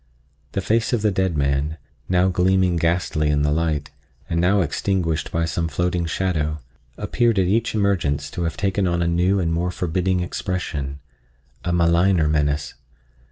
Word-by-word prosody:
The 100 Hz, -, -1 dB
face 115 Hz, +5 st, +1 dB
of 115 Hz, -3 st, +1 dB
the 105 Hz, -, +3 dB
dead 95 Hz, -3 st, 0 dB
man, 70 Hz, +2 st, 0 dB, 0.3 s
now 90 Hz, 0 st, +3 dB
gleaming 95 Hz, 0 st, +2 dB
ghastly 85 Hz, -2 st, 0 dB
in 75 Hz, -1 st, +2 dB
the 75 Hz, -, +1 dB
light, 75 Hz, -2 st, -1 dB, 0.4 s
and 85 Hz, 0 st, 0 dB
now 95 Hz, +3 st, +3 dB
extinguished 80 Hz, 0 st, -1 dB
by 85 Hz, 0 st, 0 dB
some 85 Hz, 0 st, -1 dB
floating 90 Hz, +2 st, -1 dB
shadow, 80 Hz, -3 st, -1 dB, 0.4 s
appeared 120 Hz, -3 st, +1 dB
at 95 Hz, -, +3 dB
each 110 Hz, +5 st, +1 dB
emergence 75 Hz, -9 st, 0 dB
to 85 Hz, -, -3 dB
have 80 Hz, -, -3 dB
taken 100 Hz, -1 st, 0 dB
on 85 Hz, 0 st, 0 dB
a -, -, 0 dB
new 90 Hz, +3 st, +2 dB
and 85 Hz, -2 st, 0 dB
more 85 Hz, +2 st, 0 dB
forbidding 90 Hz, +1 st, -1 dB
expression, 80 Hz, -6 st, -3 dB, 0.7 s
a 90 Hz, -, -1 dB
maligner 85 Hz, 0 st, +3 dB
menace. 75 Hz, -2 st, 0 dB
85 Hz, 160 wpm, -22 LUFS, 80-95 Hz, 0.7 s, the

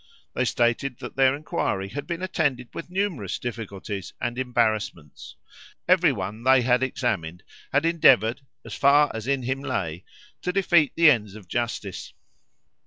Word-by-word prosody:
They -, -, 0 dB
stated 120 Hz, +2 st, 0 dB
that -, -, -9 dB
their 135 Hz, 0 st, +4 dB
inquiry 100 Hz, -9 st, -2 dB
had 145 Hz, +7 st, -6 dB
been 170 Hz, 0 st, -4 dB
attended 135 Hz, -9 st, -1 dB
with 170 Hz, -, -7 dB
numerous 180 Hz, -, -2 dB
difficulties 105 Hz, -5 st, -6 dB
and 120 Hz, 0 st, -2 dB
embarrassments; 110 Hz, -, -2 dB, 0.5 s
every 180 Hz, -3 st, +5 dB
one 105 Hz, -1 st, -5 dB
they 130 Hz, 0 st, +5 dB
had 125 Hz, 0 st, +3 dB
examined 100 Hz, -10 st, -2 dB, 0.3 s
had 145 Hz, +3 st, +2 dB
endeavoured, 135 Hz, -7 st, +4 dB, 0.2 s
as -, -, -8 dB
far 145 Hz, +1 st, +4 dB
as 110 Hz, +1 st, -6 dB
in 135 Hz, -2 st, 0 dB
him 130 Hz, +2 st, -2 dB
lay, 90 Hz, -, -3 dB, 0.4 s
to 180 Hz, -, -1 dB
defeat 175 Hz, -5 st, +3 dB
the 165 Hz, -2 st, +7 dB
ends 105 Hz, -6 st, -1 dB
of 105 Hz, -4 st, -12 dB
justice. 115 Hz, -3 st, -4 dB
125 Hz, 150 wpm, -25 LUFS, 105-145 Hz, 0.5 s, the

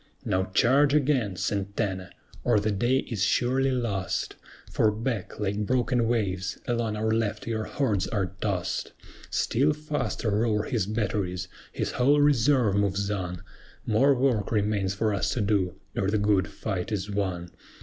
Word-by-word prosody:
Now 95 Hz, 0 st, +1 dB
charge 135 Hz, +9 st, +3 dB
again, 130 Hz, -9 st, +2 dB
SANTANA! 100 Hz, -1 st, -2 dB, 0.3 s
or 105 Hz, -, +3 dB
the 105 Hz, +1 st, 0 dB
day 120 Hz, +6 st, +2 dB
is 110 Hz, -6 st, -5 dB
surely 130 Hz, +4 st, +2 dB
lost 115 Hz, -7 st, -2 dB, 0.4 s
For 110 Hz, -, +3 dB
back, 110 Hz, -1 st, -3 dB
like 105 Hz, 0 st, -1 dB
broken 125 Hz, -1 st, +1 dB
waves, 95 Hz, -5 st, -1 dB
along 115 Hz, -3 st, 0 dB
our 110 Hz, +1 st, 0 dB
left 110 Hz, -1 st, -1 dB
your 110 Hz, -2 st, -2 dB
hordes 110 Hz, -10 st, 0 dB
are 95 Hz, -4 st, -1 dB
tossed. 95 Hz, -5 st, -2 dB, 0.4 s
Still 140 Hz, +6 st, +2 dB
faster 150 Hz, -6 st, -2 dB
roar 105 Hz, 0 st, +1 dB
his 110 Hz, -5 st, -1 dB
batteries, 100 Hz, -4 st, -2 dB, 0.2 s
his -, -, -2 dB
whole 140 Hz, +4 st, +3 dB
reserve 135 Hz, -5 st, +4 dB
moves 100 Hz, 0 st, 0 dB
on; 90 Hz, -4 st, -4 dB, 0.4 s
More 135 Hz, +6 st, +4 dB
work 125 Hz, -6 st, +1 dB
remains 105 Hz, -3 st, 0 dB
for 105 Hz, +1 st, +1 dB
us 100 Hz, -, 0 dB
to 120 Hz, -, 0 dB
do, 100 Hz, -4 st, +1 dB, 0.2 s
ere 95 Hz, -, 0 dB
the 110 Hz, -, +1 dB
good 100 Hz, -2 st, +2 dB
fight 95 Hz, -1 st, -4 dB
is 105 Hz, -1 st, -2 dB
won. 90 Hz, -4 st, -2 dB
105 Hz, 150 wpm, -27 LUFS, 100-120 Hz, 0.4 s, reserve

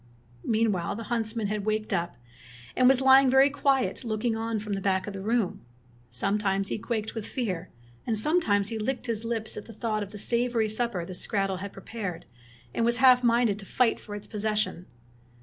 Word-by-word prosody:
Meanwhile 215 Hz, -7 st, +1 dB
the 230 Hz, -, -6 dB
huntsman 225 Hz, -1 st, 0 dB
had 205 Hz, 0 st, -2 dB
waked 215 Hz, 0 st, -1 dB
up, 170 Hz, 0 st, -1 dB, 0.6 s
and 255 Hz, -, +5 dB
was 265 Hz, -1 st, +4 dB
lying 265 Hz, 0 st, +7 dB
very 265 Hz, +2 st, +5 dB
quiet 275 Hz, -2 st, +1 dB
looking 225 Hz, 0 st, -1 dB
on 225 Hz, 0 st, -2 dB
from 210 Hz, 0 st, -4 dB
the 195 Hz, -, -2 dB
back 190 Hz, -1 st, +1 dB
of 205 Hz, -, -6 dB
the 195 Hz, -, -6 dB
room. 220 Hz, -1 st, 0 dB, 0.5 s
Sometimes 195 Hz, -, 0 dB
he -, -, -2 dB
quaked 220 Hz, -1 st, -3 dB
with 225 Hz, -2 st, -5 dB
fear, 185 Hz, -9 st, -3 dB, 0.4 s
and 225 Hz, -2 st, +1 dB
sometimes 210 Hz, -, +2 dB
he 225 Hz, -, -4 dB
licked 250 Hz, +4 st, -2 dB
his 230 Hz, -2 st, -2 dB
lips 225 Hz, -1 st, -3 dB
at 210 Hz, -, -7 dB
thought 220 Hz, -1 st, -3 dB
of 205 Hz, -, -5 dB
the 210 Hz, -, -9 dB
savory 235 Hz, 0 st, 0 dB
supper 215 Hz, -5 st, -1 dB
the 185 Hz, -, -7 dB
skrattel 195 Hz, +1 st, -1 dB
had 200 Hz, +1 st, -6 dB
prepared 195 Hz, -3 st, -6 dB, 0.5 s
and -, -, 0 dB
was 235 Hz, +1 st, +2 dB
half 255 Hz, -1 st, +6 dB
minded 235 Hz, -3 st, +3 dB
to 195 Hz, -, -8 dB
fight 250 Hz, -3 st, +2 dB
for 205 Hz, -, -8 dB
its 205 Hz, -, -8 dB
possession. 210 Hz, -4 st, -2 dB
220 Hz, 190 wpm, -27 LUFS, 200-235 Hz, 0.6 s, lying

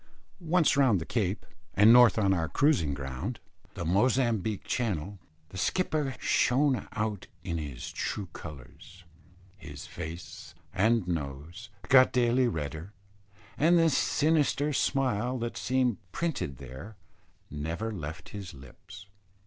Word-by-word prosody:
Once 170 Hz, -2 st, +3 dB
round 130 Hz, -9 st, +4 dB
the 80 Hz, -, -6 dB
Cape, 100 Hz, -3 st, -2 dB, 0.3 s
and 105 Hz, +3 st, +7 dB
north 120 Hz, -5 st, +7 dB
on 100 Hz, -3 st, +3 dB
our 80 Hz, -4 st, -1 dB
cruising 80 Hz, -, +2 dB
ground 65 Hz, -2 st, -5 dB, 0.4 s
the -, -, -4 dB
Mozambique 110 Hz, +1 st, +1 dB
Channel, 100 Hz, -5 st, -2 dB, 0.3 s
the 95 Hz, -, -7 dB
skipper 150 Hz, -, 0 dB
shone 130 Hz, -2 st, +2 dB
out 110 Hz, -3 st, -3 dB, 0.2 s
in 85 Hz, -1 st, -3 dB
his 70 Hz, -5 st, -6 dB
true 100 Hz, -3 st, -3 dB
colours. 85 Hz, +5 st, -11 dB, 0.6 s
His 70 Hz, -4 st, -9 dB
face 85 Hz, 0 st, -8 dB, 0.2 s
and 110 Hz, -1 st, +2 dB
nose 80 Hz, +5 st, -5 dB, 0.2 s
got 130 Hz, -1 st, +6 dB
daily 125 Hz, 0 st, +3 dB
redder; 80 Hz, 0 st, -5 dB, 0.7 s
and 170 Hz, +4 st, +5 dB
the 165 Hz, -1 st, +4 dB
sinister 150 Hz, 0 st, +1 dB
smile 130 Hz, -3 st, 0 dB
that 120 Hz, -1 st, -4 dB
seemed 125 Hz, -3 st, 0 dB
printed 150 Hz, -, -3 dB
there 65 Hz, -, -10 dB, 0.6 s
never 80 Hz, +10 st, -3 dB
left 80 Hz, -4 st, -7 dB
his 100 Hz, -6 st, -8 dB
lips. 90 Hz, +9 st, -13 dB
105 Hz, 125 wpm, -29 LUFS, 80-130 Hz, 0.7 s, and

